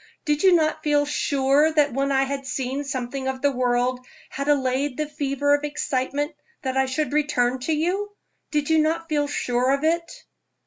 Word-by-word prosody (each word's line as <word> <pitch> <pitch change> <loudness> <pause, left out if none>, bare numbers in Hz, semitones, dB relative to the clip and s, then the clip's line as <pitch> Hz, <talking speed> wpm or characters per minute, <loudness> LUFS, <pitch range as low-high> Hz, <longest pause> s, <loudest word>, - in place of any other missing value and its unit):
Did 295 -2 +1
you 380 -2 +6
not 310 -1 +1
feel 295 -1 +2
sure 285 +1 +2
that 295 -4 +3
when 275 +2 0
I 270 0 +3
had 275 0 -4
seen 265 +2 -2
something 265 -1 -4
of 265 0 -3
the 285 - +4
world 250 0 0 0.3
had 280 +1 -4
allayed 270 -1 +1
the 305 - 0
fever 285 -1 0
of 290 0 +1
excitement 290 +1 -2 0.3
that 260 -1 -2
I 265 0 +2
should 290 +3 -2
return 260 -4 +1
to - - +3
you? 360 +7 0 0.4
Did 295 0 -1
you 320 - +5
not 325 +2 0
feel 295 -2 +1
sure 250 -3 0
of 280 - -6
it?" 335 +1 -1
285 Hz, 185 wpm, -24 LUFS, 265-300 Hz, 0.4 s, you